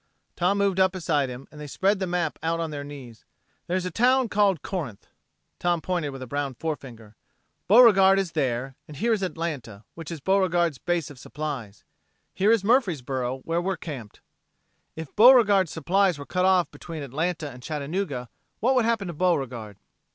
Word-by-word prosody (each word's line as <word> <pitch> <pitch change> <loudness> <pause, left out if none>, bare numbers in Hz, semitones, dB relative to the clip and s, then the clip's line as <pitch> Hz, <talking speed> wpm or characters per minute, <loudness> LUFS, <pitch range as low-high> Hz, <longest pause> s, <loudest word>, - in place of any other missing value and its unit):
Tom 180 +3 +1
moved 200 -2 +1
up 190 0 +4
beside 150 -7 0
him 125 +2 -9
and 150 - -11
they 150 - -7
spread 195 +7 +1
the 190 - -2
map 175 -3 -2
out 165 +1 -1
on 165 -1 -3
their 145 -1 -5
knees. 135 -6 -11 0.4
"There's 180 +1 -1
a 180 - -3
town 250 +4 +3
called 200 -6 +2
Corinth." 145 - -5 0.5
Tom 175 -1 +1
pointed 175 -3 -2
with 135 -1 -7
a - - -6
brown 140 0 -3
forefinger. 120 -8 -6 0.5
"Beauregard 195 -3 +7
is 195 -4 -1
there. 130 -3 -1
And 150 - -10
here 230 +8 +1
is 210 - -1
Atlanta, 155 - -4
which 165 -3 -9
is 165 -2 -6
Beauregard's 175 -4 +1
base 175 -5 -2
of 135 - -13
supplies. 125 -7 -6 0.5
Here 200 +3 +3
is 225 -4 +3
Murfreesboro 135 - 0
where 165 +4 -1
we're 190 +1 -2
camped. 130 -10 -8 0.7
If 160 -3 -8
Beauregard's 210 -7 +6
supplies 180 +2 +1
were 140 - -8
cut 180 +3 0
off 185 -4 +3
between 160 -3 -8
Atlanta 155 +3 -3
and 125 0 -12
Chattanooga, 150 -2 -3 0.3
what 250 +5 +2
would 250 -3 +2
happen 230 -3 0
to 170 - -5
Beauregard?" 130 - -1
165 Hz, 175 wpm, -25 LUFS, 140-190 Hz, 0.7 s, Beauregard